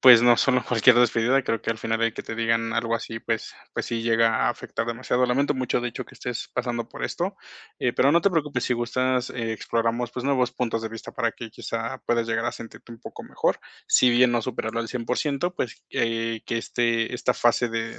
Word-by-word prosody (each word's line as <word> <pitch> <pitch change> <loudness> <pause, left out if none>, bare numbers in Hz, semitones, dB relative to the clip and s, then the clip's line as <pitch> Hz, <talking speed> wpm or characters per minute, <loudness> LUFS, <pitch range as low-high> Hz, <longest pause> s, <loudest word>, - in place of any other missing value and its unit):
pues, 125 -3 +9
no 120 -1 +6
solo 125 -1 +3
cualquier 125 +1 +5
despedida, 120 +2 +3
creo 115 -2 -1
que - - -2
al 110 - -3
final 115 0 -1
el 115 -1 +1
que - - -5
te 115 - -6
digan 115 0 +1
algo 115 0 0
así, 115 -1 -4
pues 115 -1 -3 0.2
pues - - -2
sí 115 -1 -2
llega 115 -1 +3
a - - +3
afectar 115 -1 -4
demasiado, 125 +1 0
lamento 140 +4 +2
mucho, 130 -2 -1
de 120 - -2
hecho, 120 - -6
que - - -17
estés 120 -2 -5
pasando 120 -2 -2
por - - -9
esto, 190 +3 -3 0.4
eh, 125 - +1
pero 140 +3 +3
no 170 - +5
te 200 - +3
preocupes, 150 -7 -1
si - - +1
gustas, 125 +1 0
eh, 115 -2 -3
exploramos, 115 +2 -1
pues 125 - -4
nuevos 130 -3 +1
puntos 115 -3 -1
de 110 - -3
vista 115 0 -8
para 115 -3 -1
que 115 -1 -9
quizá 115 +4 -4
puedas 115 -1 +1
llegar 115 0 0
a 120 - -1
sentirte 115 +1 -11
un 115 - -13
poco - - -9
mejor, - - 0 0.3
si 125 - +5
bien 120 +1 +5
no 120 -1 +1
superarlo 115 -1 -3
al 115 - -2
100%, 140 +7 -1
pues, 120 - -4
eh, 115 -1 -1
que 115 - -1
este 115 0 0
esta 125 - 0
fase 120 0 +2
de 115 0 -4
120 Hz, 225 wpm, -25 LUFS, 115-125 Hz, 0.4 s, pues